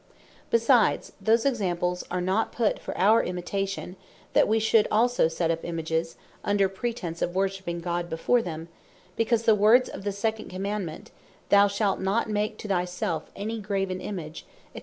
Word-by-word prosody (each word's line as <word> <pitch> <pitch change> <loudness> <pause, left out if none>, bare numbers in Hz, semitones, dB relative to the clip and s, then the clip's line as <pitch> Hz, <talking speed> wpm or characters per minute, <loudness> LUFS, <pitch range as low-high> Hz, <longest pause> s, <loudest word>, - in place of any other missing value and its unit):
Besides, 230 0 +3
those 225 +4 +3
examples 180 -8 0
are 180 0 -2
not 190 +5 0
put 230 -3 0
for - - -6
our 215 +4 +5
Imitation, 190 +1 -4 0.4
that - - +4
we 220 - +2 0.3
also 240 +1 +3
should 160 - 0
set 165 0 0
up 165 0 -3
Images, 165 0 -2 0.3
under 205 -1 +2
pretence 190 -4 -4
of 175 - -1
worshipping 190 -3 -1
God 175 0 -2
before 200 +10 +2
them; 165 -4 -6 0.5
because 230 0 +1
the 225 - +5
words 215 +5 +5
of - - -8
the 205 - -1
second 215 +2 -2
Commandement, 190 -2 -4 0.4
"Thou 200 0 +6
shalt 200 0 0
not 195 +5 0
make 215 0 -1
to - - -7
thy 185 -3 +1
selfe 180 -3 -3
any 220 +3 -4
graven 195 -2 -2
Image, 165 -6 -6 0.3
&c." - - -5
195 Hz, 165 wpm, -26 LUFS, 175-215 Hz, 0.5 s, Thou